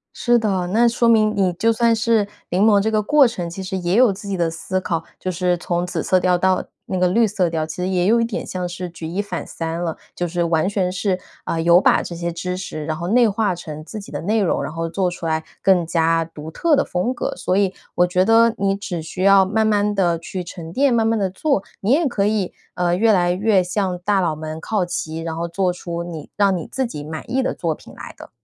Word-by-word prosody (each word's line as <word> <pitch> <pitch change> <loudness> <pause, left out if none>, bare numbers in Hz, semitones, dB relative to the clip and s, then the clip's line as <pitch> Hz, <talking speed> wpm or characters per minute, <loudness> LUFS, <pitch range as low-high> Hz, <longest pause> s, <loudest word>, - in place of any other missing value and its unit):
是 240 -1 +3
的， 195 -5 0
那 230 +6 +4
说 235 0 +2
明 215 -2 +4
你 190 -2 +2
就 225 +7 +2
算 230 0 +3
是 225 -2 +2 0.2
临 185 +3 +1
摹 210 -2 +5
这 220 +2 0
个 215 -1 +1
过 285 +5 +5
程 180 -7 -4
其 180 +3 -7
实 190 0 -4
也 175 -1 -1
有 245 -4 +5
自 200 +2 -9
己 200 -1 -2
的 170 -2 0
思 185 +3 -3
考， 165 -3 -2 0.2
就 185 - -2
是 180 0 0
从 175 0 -2
紫 - - -3
色 185 - +3
调 180 0 +2
到 185 +1 +2 0.2
那 185 - -2
个 180 - +3
绿 225 +5 +3
色 195 -5 0
调， 160 -1 -1
其 155 - -7
实 180 +1 -2
也 180 -1 +1
有 230 +3 +4
一 230 - +2
点 230 -3 -4
像 180 -1 -3
是 180 +1 -5
举 165 -1 -8
一 175 +5 -2
反 185 -4 -5
三 165 0 -4
了， 165 -2 -2 0.2
就 175 - -2
是 175 +1 -1
完 165 +1 +1
全 195 -3 0
是， 185 0 -1 0.3
呃， 165 - -2
有 170 +2 +5
把 - - +4
这 170 - -7
些 170 0 -3
知 180 +2 -4
识， 165 -4 -6
然 155 - -2
后 170 +2 -4
内 235 +2 +4
化 205 -2 0
成 155 -3 -8
自 215 +6 -7
己 200 - -11
的 - - -4
内 215 +6 +1
容， 190 - +1
然 - - -5
后 165 +1 -3
做 180 +2 0
出 175 -1 -6
来 160 0 -1 0.2
更 180 -4 +3
加 165 0 +2
独 160 -1 -9
特 320 - +2
的 280 - +3
风 180 +8 -1
格， - - -3
所 185 - -1
以 195 -1 +1 0.2
我 175 - +4
觉 180 +1 +2
得 230 +1 +5
你 195 0 +1
只 195 -4 -5
需 165 +3 -6
要 195 0 +6
慢 220 +3 +1
慢 210 -1 +2
地 175 -4 +1
去 180 +3 -5
沉 170 -2 -9
淀， 275 +5 +2
慢 225 -1 +2
慢 225 0 +2
地 195 -2 +1
做， 235 +1 0 0.2
你 205 +5 +1
也 315 +3 +3
可 205 -5 0
以， 210 -3 0 0.2
呃， 175 -1 +1
越 220 +3 +4
来 175 -2 +3
越 195 0 +2
向 185 0 -2
大 205 -1 +2
佬 170 -4 0
们 155 +1 -6
靠 205 +2 -1
齐， 160 -2 -4
然 165 0 -4
后 170 - -2
做 180 +2 0
出 170 -1 -5
你 165 -4 -8
让 200 -2 +3
你 165 - -5
自 265 -1 -2
己 150 -10 -7
满 155 +7 -7
意 260 +2 +1
的 260 - -1
作 165 -3 -2
品 - - -15
来 - - -10
的。 - - -12
185 Hz, 280 characters per minute, -21 LUFS, 170-210 Hz, 0.3 s, 要